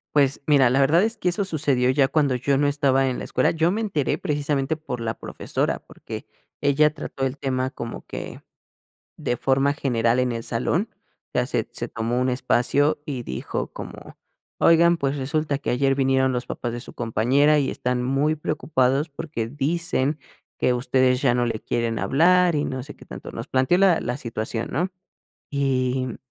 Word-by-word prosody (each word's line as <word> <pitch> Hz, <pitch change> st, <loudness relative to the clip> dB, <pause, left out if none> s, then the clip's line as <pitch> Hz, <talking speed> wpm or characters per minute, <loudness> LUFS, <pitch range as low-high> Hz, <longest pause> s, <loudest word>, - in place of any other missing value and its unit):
Pues 140 Hz, -2 st, +3 dB
mira, 140 Hz, -5 st, +5 dB
la 135 Hz, +2 st, +3 dB
verdad 165 Hz, +8 st, +4 dB
es 225 Hz, +1 st, 0 dB
que 180 Hz, -, 0 dB
eso 190 Hz, +3 st, 0 dB
sucedió 140 Hz, -7 st, +1 dB
ya 135 Hz, 0 st, +3 dB
cuando 140 Hz, -4 st, +2 dB
yo 135 Hz, +2 st, +1 dB
no 145 Hz, 0 st, +2 dB
estaba 135 Hz, -2 st, +2 dB
en 125 Hz, -, -1 dB
la -, -, -5 dB
escuela, 130 Hz, -, +1 dB
yo 165 Hz, +2 st, +2 dB
me 215 Hz, -, -1 dB
enteré 180 Hz, -11 st, 0 dB
precisamente 145 Hz, 0 st, -1 dB
por 150 Hz, -6 st, -6 dB
la 115 Hz, -1 st, -2 dB
profesora, -, -, -3 dB
porque -, -, -9 dB, 0.3 s
ella 150 Hz, +2 st, +3 dB
trató 135 Hz, -3 st, -4 dB
el 135 Hz, +2 st, -3 dB
tema 130 Hz, -1 st, -1 dB
como 115 Hz, -4 st, -7 dB
que, -, -, -7 dB, 0.8 s
de 120 Hz, -, -1 dB
forma 135 Hz, +3 st, +2 dB
general 120 Hz, -4 st, +1 dB
en 125 Hz, -1 st, 0 dB
el 115 Hz, -1 st, -4 dB
salón, 160 Hz, -, 0 dB, 0.4 s
ya -, -, +1 dB
se -, -, -2 dB
se -, -, -4 dB
tomó 115 Hz, +2 st, -2 dB
un 130 Hz, -, +1 dB
espacio 130 Hz, +3 st, +2 dB
y 130 Hz, -5 st, -4 dB
dijo 65 Hz, -, -4 dB
como: -, -, -9 dB, 0.4 s
"Oigan, 170 Hz, +1 st, +5 dB
pues 140 Hz, -2 st, -1 dB
resulta 145 Hz, +1 st, -1 dB
que 140 Hz, -, -4 dB
ayer 135 Hz, +2 st, +2 dB
vinieron 130 Hz, -1 st, +2 dB
los 125 Hz, 0 st, -2 dB
papás 120 Hz, -, -4 dB
de 120 Hz, -, -5 dB
su -, -, -9 dB
compañera 130 Hz, +6 st, +3 dB
y 135 Hz, -, 0 dB
están 125 Hz, 0 st, -1 dB
muy 140 Hz, +5 st, +1 dB
preocupados 140 Hz, -1 st, 0 dB
porque 140 Hz, -6 st, -4 dB
dicen 150 Hz, 0 st, -1 dB, 0.4 s
que 125 Hz, -, +2 dB
ustedes 125 Hz, +1 st, +2 dB
ya 125 Hz, -4 st, +3 dB
no 120 Hz, 0 st, +1 dB
le 110 Hz, -2 st, -2 dB
quieren 115 Hz, -1 st, -1 dB
hablar", 175 Hz, +3 st, +4 dB
y 145 Hz, -, +1 dB
no 130 Hz, -1 st, -3 dB
sé 145 Hz, -, -10 dB
qué -, -, -15 dB
tanto, -, -, -9 dB
nos -, -, -6 dB
planteó 130 Hz, +7 st, +3 dB
la 190 Hz, -4 st, +4 dB
la 120 Hz, -, -3 dB
situación, 115 Hz, -2 st, -4 dB
¿no?, 180 Hz, +6 st, 0 dB, 0.6 s
y 130 Hz, -3 st, 0 dB
135 Hz, 185 wpm, -24 LUFS, 125-150 Hz, 0.8 s, mira